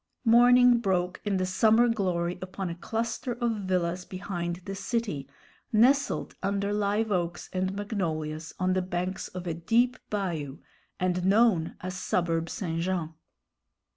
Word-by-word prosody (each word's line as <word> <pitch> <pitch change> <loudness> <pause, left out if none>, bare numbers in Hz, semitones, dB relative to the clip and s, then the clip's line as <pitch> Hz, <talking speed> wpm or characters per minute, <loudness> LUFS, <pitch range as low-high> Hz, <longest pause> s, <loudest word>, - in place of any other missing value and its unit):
Morning 245 +1 +6
broke 185 -4 0
in 195 -3 0
summer 220 +5 +4
glory 180 -6 -1
upon 185 -1 -4
a - - -5
cluster 225 +5 -3
of 240 -1 0
villas 180 -1 0
behind 175 -2 -4
the 195 - -4
city, 195 - -3 0.4
nestled 260 +6 +3
under 200 +1 0
live 210 +1 0
oaks 175 -2 -2
and 185 +1 -1
magnolias 160 -7 -3
on 185 0 +1
the 185 - +1
banks 180 +1 -3
of 180 0 -7
a 170 - -1
deep 235 +9 +2
bayou, 165 -9 -3 0.4
and 180 0 0
known 195 -4 +3
as 185 0 -5
Suburb 170 -3 0
St. 165 -4 -3
Jean. 170 -3 -2
185 Hz, 140 wpm, -28 LUFS, 175-220 Hz, 0.4 s, Morning